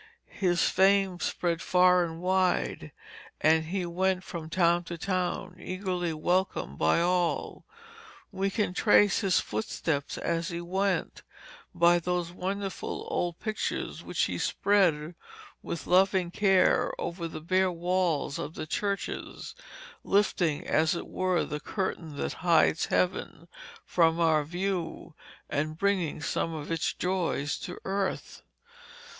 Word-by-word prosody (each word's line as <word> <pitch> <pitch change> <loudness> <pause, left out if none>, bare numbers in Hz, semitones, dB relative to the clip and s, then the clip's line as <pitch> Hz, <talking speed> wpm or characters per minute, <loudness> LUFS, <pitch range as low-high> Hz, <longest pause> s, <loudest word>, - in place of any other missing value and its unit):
His 175 -3 +1
fame 195 -1 +3
spread 170 -2 -1
far 180 0 +4
and 165 -1 -5
wide, 185 0 0 0.5
and 160 +1 +3
he 180 +2 -2
went 185 +2 0
from 165 -5 -7
town 175 0 +2
to 170 - -6
town 185 +1 -2
eagerly 185 -2 -3
welcomed 170 - -1
by 80 - +3
all. 175 0 0 0.7
We 195 0 -1
can 205 -2 -1
trace 205 -1 +4
his 195 -5 +2
footsteps 140 +7 -3
as 165 0 -1
he 170 -1 -4
went, 190 +2 -1 0.5
by 175 0 +5
those 175 0 -2
wonderful 195 +2 -4
old 175 -1 -1
pictures 215 -1 -3
which - - -1
he - - -1
spread 180 -6 +2 0.5
with 170 - -5
loving 185 -1 +3
care 195 -1 +3
over 170 -1 -4
the 160 -1 -7
bare 185 +3 +1
walls 175 -4 0
of 150 - -5
the - - -4
churches, 200 +5 -3 0.5
lifting, 180 -6 +1
as 160 +2 +2
it - - -5
were, 185 -2 0
the 150 - -4
curtain 165 -4 -4
that - - -2
hides 170 -2 +3
Heaven 180 -2 -1 0.4
from 165 -1 +2
our 160 -3 +3
view 175 0 -3 0.3
and 155 +2 -2
bringing 185 -5 0
some 165 - -1
of 150 +1 -6
its 165 -2 0
joys 175 -5 -1
to 180 - -7
earth. 195 0 -3
175 Hz, 130 wpm, -28 LUFS, 165-190 Hz, 0.7 s, by